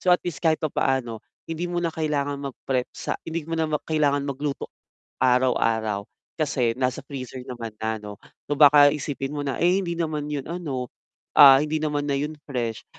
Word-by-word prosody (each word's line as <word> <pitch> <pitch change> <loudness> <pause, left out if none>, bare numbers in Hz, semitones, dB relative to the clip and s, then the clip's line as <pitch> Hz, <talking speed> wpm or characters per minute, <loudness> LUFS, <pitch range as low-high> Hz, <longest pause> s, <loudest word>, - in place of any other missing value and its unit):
So, - - -3
at - - -2
least 175 -4 -3
kahit 160 -1 +2
papaano 130 -6 0 0.3
hindi 165 +1 -3
mo 175 0 -2
na 170 - 0
kailangan 145 -3 -1
magprep 130 -2 -2
sa - - -4
hindi 165 0 -3
mo 165 - -2
na 160 - +1 0.2
kailangan 145 -3 +1
magluto 140 0 -3 0.5
araw-araw 115 -5 +2 0.3
kasi 130 -6 +1
nasa 130 -1 0
freezer 130 -2 -7
naman 115 -4 -6
na 110 0 -1
'no. 105 -1 -8 0.3
So, 145 - -2
baka 145 0 +8
isipin 140 -1 -4
mo 145 - -3
na, 135 - -2
eh, 180 +3 +3
hindi 170 -2 -3
naman 155 -3 -2
yun 140 -2 -3
ano, 145 -8 -4 0.5
ah, 140 -3 +10
hindi 155 +1 -1
naman 150 -2 -1
na 140 - +1
yun 150 +2 -3
fresh. 120 -5 -3
145 Hz, 180 wpm, -24 LUFS, 130-155 Hz, 0.5 s, ah